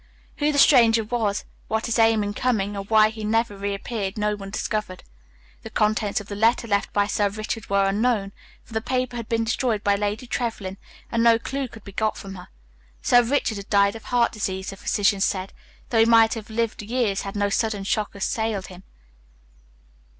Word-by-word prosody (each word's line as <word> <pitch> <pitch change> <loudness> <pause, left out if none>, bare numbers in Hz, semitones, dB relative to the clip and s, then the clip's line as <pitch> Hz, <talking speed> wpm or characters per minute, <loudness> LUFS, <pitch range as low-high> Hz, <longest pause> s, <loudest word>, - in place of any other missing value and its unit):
Who 295 0 +1
the 290 - -2
stranger 230 -6 +6
was, 215 -2 -1 0.2
what 220 +1 -1
his 230 0 0
aim 225 -1 +4
in 205 0 -3
coming, 210 -5 0
or 200 - -4
why 215 +1 +5
he 220 0 -8
never 225 0 0
reappeared, 200 +1 -4
no 210 0 0
one 195 -1 -8
discovered. 210 -2 -3 0.6
The - - -8
contents 215 -1 +1
of 205 - -9
the 205 - -6
letter 230 +3 +2
left 200 -2 0
by 205 0 +2
Sir 205 0 +1
Richard 215 +1 -5
were 200 0 +3
unknown, 205 0 0 0.3
for 230 - -16
the 220 - -1
paper 255 +1 -2
had 230 -2 -6
been 230 -1 +1
destroyed 225 -1 -1
by 200 - +3
Lady 210 +4 -2
Trevlyn 225 -6 -3 0.3
and 230 - +1
no 230 -1 +6
clue 270 +3 -4
could 225 -3 -14
be 200 - -10
got 215 +2 -1
from 195 -1 -8
her. 180 -2 -10 0.6
Sir 245 - +6
Richard 240 -3 0
had 200 - -9
died 200 0 +3
of 220 -2 -10
heart 240 -1 +2
disease, 190 -3 -3
the - - -8
physicians 200 0 +1
said, 190 0 -2 0.4
though 230 - +3
he 225 - +6
might 225 -1 +5
have 225 -2 -7
lived 225 0 -2
years 215 -2 -1
had 195 0 -6
no 205 0 +1
sudden 210 -1 -1
shock 210 +1 -1
assailed 205 0 -2
him. 180 - -12
215 Hz, 200 wpm, -24 LUFS, 200-230 Hz, 0.6 s, stranger